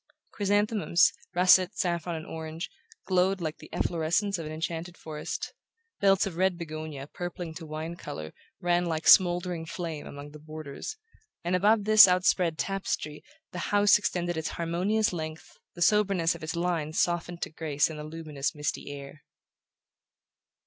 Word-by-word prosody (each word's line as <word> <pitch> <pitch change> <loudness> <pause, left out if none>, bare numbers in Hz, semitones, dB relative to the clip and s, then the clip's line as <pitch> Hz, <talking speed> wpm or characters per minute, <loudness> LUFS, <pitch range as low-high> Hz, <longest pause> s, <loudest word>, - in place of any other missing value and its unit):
Chrysanthemums, 205 -3 +2 0.2
russet, 185 +2 +5
saffron 170 -2 -1
and 160 0 -6
orange, 160 +1 -6 0.3
glowed 185 +1 +2
like 155 -3 -4
the - - -13
efflorescence 175 +4 0
of 160 - -5
an - - -6
enchanted 165 +2 -4
forest; 155 -1 -5 0.5
belts 195 -1 +4
of 180 -4 -5
red 185 -1 +2
begonia 155 -4 -6
purpling 175 +1 -6
to 160 0 -9
wine 155 +2 -5
colour 80 - -7 0.3
ran 175 0 +1
like 160 -1 -2
smouldering 175 -2 +5
flame 165 -2 -5
among 145 +1 -9
the 150 - -11
borders; 155 - -7 0.5
and 175 +2 +1
above 205 +3 +4
this 215 0 +9
outspread 180 -2 +2
tapestry 185 -6 -3 0.3
the 180 - -5
house 205 0 +5
extended 175 -4 -1
its 160 - -2
harmonious 180 +6 +1
length, 160 -2 -7 0.2
the 175 - +1
soberness 195 -4 +3
of 170 - -10
its 160 +2 -4
lines 170 -3 -1
softened 175 0 0
to - - -5
grace 155 -2 0
in 160 - -7
the 150 - -6
luminous 155 -3 -4
misty 150 -1 -3
air. 140 +1 -9
170 Hz, 150 wpm, -28 LUFS, 155-185 Hz, 0.5 s, this